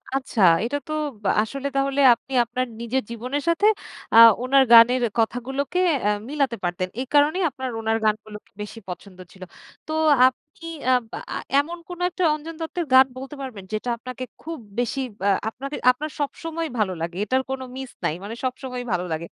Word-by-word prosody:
আচ্ছা, 260 -4 -2 0.2
এটা 285 +4 -1
তো 310 - -4 0.5
আসলে 275 +6 -4
তাহলে 275 0 0
আপনি 265 +3 -9
আপনার 255 +2 -2 0.2
নিজের 255 +3 -1
জীবনের 255 +5 -3
সাথে 335 +5 +2 0.5
আ - - +6 0.3
ওনার 270 +1 +5
গানের 235 +2 +8 0.2
কথাগুলোকে 265 +8 -1 0.3
এ - - +4 0.2
মিলাতে 275 -5 0
পারতেন। 175 +1 -1
এই 265 - -3
কারণেই 300 +6 +4
আপনার 260 -1 -5
ওনার 225 0 +1
গানগুলোকে 215 0 -3
বেশি 210 +2 -7
পছন্দ 185 +1 -9
ছিল। 190 -1 -12 0.4
তো - - -5 0.4
আপনি 300 +5 -7 0.3
আব 250 -2 +3
আ - - -5 0.2
আ - - -1 0.2
এমন 335 +4 -2
কোনো 355 0 -7
একটা 365 +1 -3
অঞ্জন 310 +2 -8
দত্তের 335 +1 -3
গান 260 0 +9
বলতে 270 +3 -7
পারবেন 245 -8 -7
যেটা 215 +3 -2
আপনাকে 255 +1 -7 0.2
খুব 330 +1 -6 0.2
বেশি 245 +2 -1 0.3
আ - - +5 0.2
আপনাকে 275 +5 -7 0.2
আপনার 300 +5 -5
সবসময়ই 325 +1 -3
ভালো 195 -3 +1
লাগে। 170 +1 -4
এটার 260 +5 +1
কোনো 265 0 -3
মিস 265 -1 -6
নাই। - - +1
মানে 215 +3 -6
সবসময়ই 255 -1 -4
ভালো 180 0 0
লাগে। 160 +1 -3
260 Hz, 175 wpm, -23 LUFS, 225-285 Hz, 0.5 s, গান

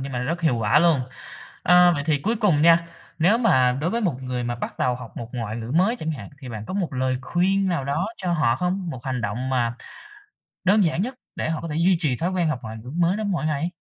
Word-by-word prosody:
nhưng 135 0 -5
mà 125 - -2
nó 125 - -2
rất 170 +5 -2
hiệu 155 -8 +2
quả 115 +6 +3
luôn. 165 -4 +4 0.6
Ơ, 180 0 +6
vậy 145 -2 -2
thì 155 -3 +2
cuối 220 +11 -1
cùng 190 -9 +2
nha, 170 0 +5 0.3
nếu 190 +8 +4
mà 130 - +3
đối 165 - 0
với 235 +4 -1
một 150 - -1
người 125 -1 -3
mà 120 0 -2
bắt - - -6
đầu 125 -1 +1
học 125 -3 -10
một 115 0 -6
ngoại 115 -3 -4
ngữ 115 +1 -5
mới 190 +9 +3
chẳng 160 -7 -3
hạn 115 -10 -7
thì 130 -3 -9
bạn 110 -2 -6
có - - -6
một 180 -7 -2
lời 130 0 0
khuyên 190 +6 +1
nào 160 -6 -1
đó 160 +8 -1
cho 180 -2 -2
họ 130 -8 +2
không? 180 0 -2
Một 130 -6 -7
hành 130 -3 -2
động 115 +5 -3
mà 120 -2 0 0.9
đơn 200 +1 +4
giản 165 +3 +1
nhất 255 +4 -3 0.2
để - - -2
họ 160 - -2
có 165 - -6
thể 150 - -3
duy 175 +2 +3
trì 140 -8 +1
thói 175 +7 -1
quen 175 -3 0
học 150 - -1
ngoại 110 0 -7
ngữ 115 +3 -9
mới 175 +3 +2
đó 215 - -3
mỗi 185 -6 -1
ngày? 155 +3 -1
155 Hz, 270 wpm, -23 LUFS, 125-180 Hz, 0.9 s, Ơ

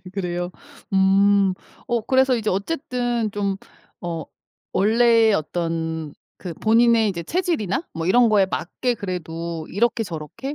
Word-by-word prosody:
네 180 - -10
그래요. 175 -2 -3 0.4
음. 195 0 +4 0.3
어 240 -2 0
그래서 260 0 +3
이제 215 -2 -1
어쨌든 240 - -2
좀 200 -1 -2 0.4
어 170 -2 -4 0.5
원래 225 +1 +4
어떤 160 -2 -2 0.2
그 175 -3 -7
본인의 225 +1 +4
이제 170 -4 -4
체질이나 330 - -1
뭐 165 +1 -4
이런 235 +4 +5
거에 200 -3 +4
맞게 245 +7 -2
그래도 170 -4 -5
이렇게 225 +3 0
저렇게 170 - -6
200 Hz, 260 characters per minute, -22 LUFS, 175-235 Hz, 0.5 s, 이런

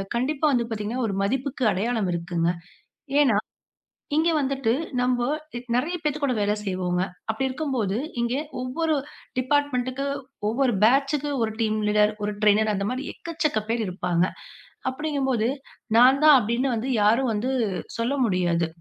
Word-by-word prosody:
கண்டிப்பா 275 +5 0
வந்து 240 -3 +2
பாத்தீங்கன்னா 225 +3 -3
ஒரு 200 - -2
மதிப்புக்கு 265 +4 -1
அடையாளம் 215 0 0
இருக்குங்க. 170 0 -1 0.7
ஏன்னா 250 -8 +4 0.8
இங்க 325 +2 +3
வந்துட்டு 270 -4 0 0.9
நம்போ 245 - -19
நிறைய 300 +8 0
பேத்து 300 -1 -1
கூட 275 -3 +2
வேலை 205 0 +1
செய்வோங்க. 185 -2 -1 0.3
அப்படி 245 +5 -1
இருக்கும்போது 255 -8 -1 0.2
இங்க 235 +1 0 0.3
ஒவ்வொரு 315 +6 0 0.4
டிபார்ட்மென்ட்க்கு 265 -1 0 0.4
ஒவ்வொரு 255 +2 +1
பேட்ச்க்கு 275 +4 +3
ஒரு 220 -1 0
டீம் 215 -1 +1
லீடர், 210 0 +3
ஒரு 210 0 -1
ட்ரைனர் 215 +1 +4
அந்த 200 0 -1
மாதிரி 255 +2 -3
எக்கச்சக்க 310 -9 -1
பேர் 230 -1 +1
இருப்பாங்க. 180 -1 0 0.7
அப்டிங்கும்போது 265 -5 0 0.5
நான் 260 +4 +6
தான் 300 -3 +9
அப்படின்னு 240 +3 0
வந்து 235 +4 -3
யாரும் 230 +4 +3
வந்து 235 +5 -1 0.5
சொல்ல 235 +5 0
முடியாது. 175 -4 +1
245 Hz, 135 wpm, -25 LUFS, 210-275 Hz, 0.9 s, தான்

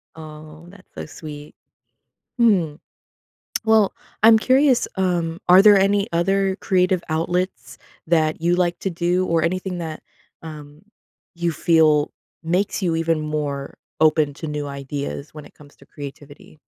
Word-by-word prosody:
Oh, 155 +1 -12
that's 190 0 -18
so - - -6
sweet. 150 -1 -10 0.9
Mm. 180 -10 +2 0.9
Well, 220 -2 +3 0.3
I'm 225 0 +7
curious, 260 +2 +3
um, 175 -3 -1
are 180 +1 +8
there 205 0 +7
any 200 +1 +2
other 190 +3 +1
creative 185 -1 +1
outlets 175 +4 -2 0.3
that 155 -2 +1
you 170 +1 +2
like 175 -1 0
to 195 - -2
do, 175 +2 0
or 165 -2 +1
anything 185 +2 -2
that, 160 -2 -6 0.4
um, 150 -1 -11 0.5
you 170 -1 -1
feel 155 -3 +3 0.3
makes 180 +5 -1
you 170 -3 0
even 165 -1 0
more 150 -2 -4 0.2
open 155 -2 +3
to 160 - -7
new 150 -1 -4
ideas 140 +1 -6
when 150 -1 -10
it - - -17
comes 145 -1 -18
to - - -20
creativity? 145 +1 -11
165 Hz, 140 wpm, -21 LUFS, 150-185 Hz, 0.9 s, are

